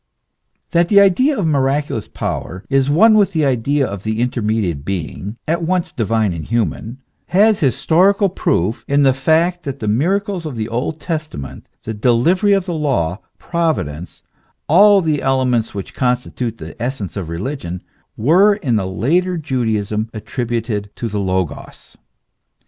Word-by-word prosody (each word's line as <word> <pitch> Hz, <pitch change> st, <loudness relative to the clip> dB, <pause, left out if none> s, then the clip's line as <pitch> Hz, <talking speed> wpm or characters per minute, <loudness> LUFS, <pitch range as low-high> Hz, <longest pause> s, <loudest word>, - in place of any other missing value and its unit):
That 170 Hz, 0 st, +2 dB
the 200 Hz, -, +6 dB
idea 255 Hz, +9 st, +4 dB
of 200 Hz, -, 0 dB
miraculous 140 Hz, -5 st, 0 dB
power 90 Hz, +4 st, -5 dB
is 135 Hz, 0 st, +2 dB
one 215 Hz, +10 st, +5 dB
with 200 Hz, -2 st, +3 dB
the 155 Hz, -3 st, +1 dB
idea 135 Hz, +2 st, +1 dB
of 100 Hz, -5 st, -6 dB
the 110 Hz, +1 st, -3 dB
intermediate 110 Hz, -, -1 dB
being, 95 Hz, +4 st, -5 dB
at 170 Hz, +2 st, 0 dB
once 180 Hz, 0 st, -1 dB
divine 110 Hz, -3 st, 0 dB
and 80 Hz, -2 st, -5 dB
human, 115 Hz, -, -2 dB, 0.3 s
has 210 Hz, +3 st, +3 dB
historical 180 Hz, -, +3 dB
proof 110 Hz, -, -1 dB
in 140 Hz, 0 st, +3 dB
the 135 Hz, -1 st, +5 dB
fact 160 Hz, +6 st, +1 dB
that 140 Hz, -4 st, -5 dB
the 110 Hz, -, -4 dB
miracles 185 Hz, -, 0 dB
of 145 Hz, -, -6 dB
the 110 Hz, -1 st, -3 dB
Old 125 Hz, +7 st, -3 dB
Testament, 155 Hz, -, -6 dB
the 110 Hz, -, -4 dB
delivery 130 Hz, -, +2 dB
of 195 Hz, -2 st, +1 dB
the 175 Hz, -, -3 dB
law, 120 Hz, -, -1 dB, 0.2 s
Providence 150 Hz, -, -3 dB, 0.4 s
all 200 Hz, +5 st, +6 dB
the 155 Hz, -4 st, 0 dB
elements 130 Hz, -5 st, 0 dB
which 100 Hz, -, -6 dB
constitute 125 Hz, -2 st, -2 dB
the -, -, -9 dB
essence 120 Hz, -6 st, -4 dB
of 95 Hz, -5 st, -5 dB
religion, 90 Hz, -, -5 dB, 0.3 s
were 185 Hz, -, +4 dB
in 130 Hz, -, 0 dB
the 95 Hz, -3 st, -1 dB
later 170 Hz, -, 0 dB
Judaism 110 Hz, -7 st, -1 dB
attributed 115 Hz, -2 st, -3 dB
to 115 Hz, -, -4 dB
the 105 Hz, 0 st, -3 dB
Logos. 95 Hz, -3 st, -4 dB
130 Hz, 150 wpm, -18 LUFS, 110-170 Hz, 0.4 s, the